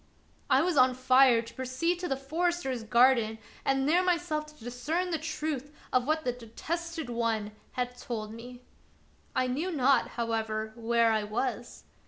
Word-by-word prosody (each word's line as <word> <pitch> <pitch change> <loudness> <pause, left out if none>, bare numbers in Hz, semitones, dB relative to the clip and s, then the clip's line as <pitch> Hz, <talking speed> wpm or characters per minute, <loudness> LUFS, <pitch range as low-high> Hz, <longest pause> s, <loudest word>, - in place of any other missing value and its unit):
I 270 - +5
was 350 -3 0
on 255 -1 +5
fire 255 -2 +5
to 230 - -12
proceed 260 +8 -1
to 360 - -3
the 270 - -1
forester's 310 -2 -1
garden 235 -1 +4 0.3
and 270 0 +1
there 350 +4 +4
myself 340 -4 0
to 300 -6 -16
discern 300 +10 -2
the 325 - 0
truth 305 -3 -3 0.2
of 255 0 +2
what 315 +1 +1
the 250 - +2
Detested 320 +8 -5
One 230 -3 -1 0.2
had 250 0 -3
told 220 -3 -5
me. 245 +2 -10 0.7
I 255 - +2
knew 280 +9 -1
not, 275 -3 +3
how 230 -1 -1
ever, 220 -1 -2
where 230 0 +2
I 215 -1 +1
was. 240 +2 -3
255 Hz, 165 wpm, -29 LUFS, 235-310 Hz, 0.7 s, I